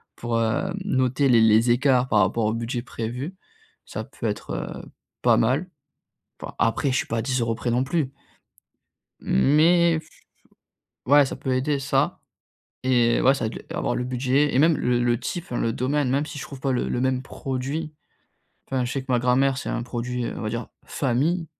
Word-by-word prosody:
pour, 120 -1 -3
heu, 115 +12 0
noter 130 -4 +1
les 115 -2 +6
les 110 +2 +5
écarts 130 0 +3
par 105 - +3
rapport 105 +4 +1
au 110 - +1
budget 115 +1 -3
prévu 125 +9 -5 0.5
ça - - -5
peut - - -9
être, - - -4 0.3
heu, - - -16 0.3
pas - - +4
mal. 185 - +1 0.7
Enfin, - - -7
après 130 +4 +1
je 130 - +1
suis - - -1
pas 115 - -2
à - - 0
10 120 -4 0
près 120 - -2
non 125 +2 +2
plus. 140 -1 -1 1.1
Mais 165 - +4 1.1
Ouais 145 +1 +6
ça - - -4
peut 130 -1 -2
aider 140 +3 0
ça 140 +5 0 0.6
et 120 -2 +3
ouais 135 - +5
ça 135 - -3
va - - -8
être - - -9
avoir - - -1
le - - -1
budget 130 +3 +1
et - - +2
même 160 +2 +5
le 125 0 +1
le 120 0 +1
type 170 +7 -4
enfin 120 - -5
le 115 - 0
domaine 130 +2 0
même 140 +3 +1
si 155 - -8
je - - -5
trouve 140 - -9
pas 135 0 -1
le 125 - -1
le 125 - -1
même 130 0 0
produit, 135 +4 -4 0.8
enfin, 130 -2 0
je 120 - -3
sais 135 +1 -2
que 130 -1 -4
ma 120 - +3
grand-mère 130 +2 +2
c'est - - -5
un 115 - -2
produit, 125 0 -3
heu, - - -4
on - - -6
va 110 - -2
dire 115 +2 -4 0.2
famille 150 +7 0
130 Hz, 200 wpm, -24 LUFS, 120-140 Hz, 1.1 s, les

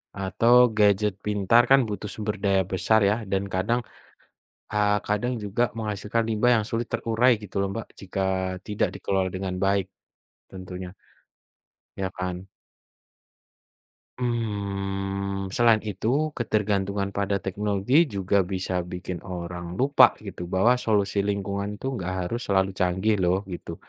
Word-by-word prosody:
atau 100 +5 +2 0.2
gadget 105 0 +4
pintar 105 +3 +4
kan 135 - +8
butuh 105 0 -4
sumber 105 -1 -3
daya 95 -1 +3
besar 110 +4 +3
ya 105 - +2 0.2
dan 95 0 +1
kadang, 110 +7 +1 0.9
eee, 105 0 +3
kadang 105 +5 0
juga 105 +4 0
menghasilkan 105 +1 -1
limbah 115 +3 +3
yang 105 - -1
sulit 115 +1 -2
terurai 115 +3 +2
gitu 105 -2 -11
loh 100 - 0
Mbak 115 - -5
jika 95 0 -4 0.4
tidak 105 -1 0
dikelola 95 -1 0
dengan 95 -1 -3
baik 100 -1 +2 0.6
tentunya. 95 0 -8 1.0
Ya 95 -1 -2
kan? 90 0 -5 1.7
Mmm, 100 -4 -2
selain 115 +1 +4
itu, 120 +10 -1
ketergantungan 100 -3 0
pada 100 0 -1
teknologi 105 - +2
juga 100 -4 0
bisa 95 -1 -2
bikin 90 0 -5
orang 85 -1 -6
lupa 135 +6 +5
gitu 90 - -7
bahwa 110 +8 +3
solusi 100 -4 +1
lingkungan 100 0 -2
itu 130 +5 -4
nggak 95 0 -3 0.2
harus 120 +1 -3
selalu 95 -1 +2
canggih 95 +4 +1
loh, 95 +2 +1
gitu. 85 -1 -6
100 Hz, 130 wpm, -25 LUFS, 95-110 Hz, 1.7 s, kan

